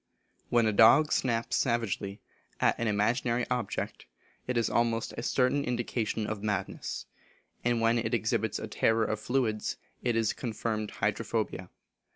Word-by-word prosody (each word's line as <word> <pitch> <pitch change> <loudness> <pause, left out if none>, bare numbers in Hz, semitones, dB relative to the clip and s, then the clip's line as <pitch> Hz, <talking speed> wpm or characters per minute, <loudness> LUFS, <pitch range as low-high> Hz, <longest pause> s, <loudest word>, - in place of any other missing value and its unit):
When 120 -1 +4
a 110 - +2
dog 130 +9 +6
snaps 115 -2 +1
savagely 115 -5 -1 0.4
at - - +4
an 115 - 0
imaginary 115 +3 +1
object, 125 -5 -3 0.4
it 125 -1 0
is 115 - +2
almost 115 -1 0
a - - -4
certain 130 +3 +2
indication 120 -3 -1
of 105 -1 -4
madness; 105 -2 -3 0.6
and 120 -1 +1
when 115 +1 +3
it 115 -1 -2
exhibits 110 -2 0
a - - -5
terror 110 0 +2
of 110 0 -2
fluids, 110 -2 -1 0.2
it 120 -2 0
is 115 -2 +2
confirmed 110 -2 -3
hydrophobia. - - -2
115 Hz, 145 wpm, -29 LUFS, 110-120 Hz, 0.6 s, dog